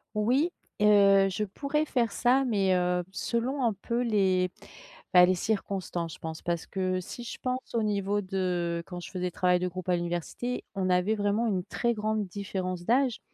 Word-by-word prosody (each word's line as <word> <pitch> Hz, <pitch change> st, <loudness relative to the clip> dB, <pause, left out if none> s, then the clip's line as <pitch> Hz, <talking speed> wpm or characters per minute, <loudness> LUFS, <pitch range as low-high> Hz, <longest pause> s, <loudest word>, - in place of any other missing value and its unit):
Oui, 250 Hz, +10 st, +2 dB, 0.3 s
heu, 200 Hz, -2 st, +6 dB
je 195 Hz, +3 st, -2 dB
pourrais 280 Hz, +9 st, -1 dB
faire 240 Hz, -6 st, +1 dB
ça, 255 Hz, +2 st, +3 dB
mais, 200 Hz, -6 st, +2 dB
heu, 180 Hz, 0 st, +1 dB
selon 240 Hz, +7 st, -2 dB
un 225 Hz, -, +2 dB
peu 235 Hz, +5 st, -2 dB
les 190 Hz, -6 st, +2 dB, 0.7 s
bah, 180 Hz, 0 st, +9 dB
les 185 Hz, +1 st, +3 dB
circonstances 185 Hz, -4 st, -2 dB
je -, -, -14 dB
pense. 160 Hz, -1 st, -6 dB
Parce 170 Hz, -2 st, -2 dB
que 185 Hz, -1 st, -1 dB
si 210 Hz, +6 st, -8 dB
je 235 Hz, -, -7 dB
pense 255 Hz, -1 st, -3 dB
au 230 Hz, -2 st, +1 dB
niveau 205 Hz, -1 st, 0 dB
de 180 Hz, -3 st, -1 dB
quand 180 Hz, -, -7 dB
je 175 Hz, -, -7 dB
fais 185 Hz, -, -4 dB
des 180 Hz, 0 st, -1 dB
travails 180 Hz, 0 st, +2 dB
de 180 Hz, -, 0 dB
groupe 185 Hz, 0 st, -7 dB
à 180 Hz, -, +3 dB
l'université, 175 Hz, +8 st, -3 dB
on 190 Hz, -2 st, -1 dB
avait 180 Hz, +4 st, +2 dB
vraiment 205 Hz, +2 st, 0 dB
une 190 Hz, -5 st, 0 dB
très 235 Hz, +4 st, -1 dB
grande 215 Hz, -1 st, -1 dB
différence 185 Hz, -2 st, -4 dB
d'âge. 250 Hz, +3 st, +2 dB
195 Hz, 190 wpm, -28 LUFS, 180-230 Hz, 0.7 s, bah